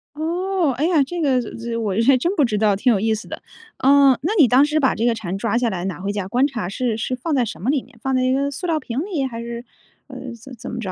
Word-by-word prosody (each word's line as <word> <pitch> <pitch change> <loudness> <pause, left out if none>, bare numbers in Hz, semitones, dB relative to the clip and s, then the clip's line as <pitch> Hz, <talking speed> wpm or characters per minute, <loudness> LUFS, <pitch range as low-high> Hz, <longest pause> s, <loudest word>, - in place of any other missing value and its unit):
哦， 345 +1 0
哎 295 - +1
呀 330 -4 +3
这 345 +6 -5
个， 265 -4 +2 0.4
我 205 -3 -1
还 275 - +7
真 340 +9 0
不 295 - +4
知 215 -3 -1
道 210 -1 +3
挺 245 +6 +2
有 200 - +1
意 220 +1 +2
思 220 +1 -5
的。 - - -7 0.4
呃， 275 -1 +5
那 330 +9 -1
你 285 - +7
当 255 +5 +5
时 305 +1 0
把 265 -3 +2
这 225 - -1
个 240 - +3
蝉 195 -4 -4
抓 230 +3 0
下 240 -1 +1
来 180 -4 -4
拿 185 -4 -4
回 195 +2 -4
家 205 -2 -3
观 250 +7 +2
察 235 -10 -4
是 235 +3 -1
是 230 +3 -2
放 295 +5 -2
在 255 - +3
什 220 - -6
么 225 - -1
里 280 -2 +1
面？ 250 -3 -21
放 265 +1 -1
在 255 - +2
一 255 - +2
个 280 +1 0
塑 285 +6 -6
料 325 -3 +1
瓶 255 -3 -4
里？ 335 -9 -2
还 230 -3 -5
是， 235 +1 -6 0.4
呃， - - -11 0.3
怎 270 - -12
么 - - -11
怎 225 - -8
么 235 - -5
着？ 195 -5 -4
255 Hz, 315 characters per minute, -21 LUFS, 225-285 Hz, 0.4 s, 还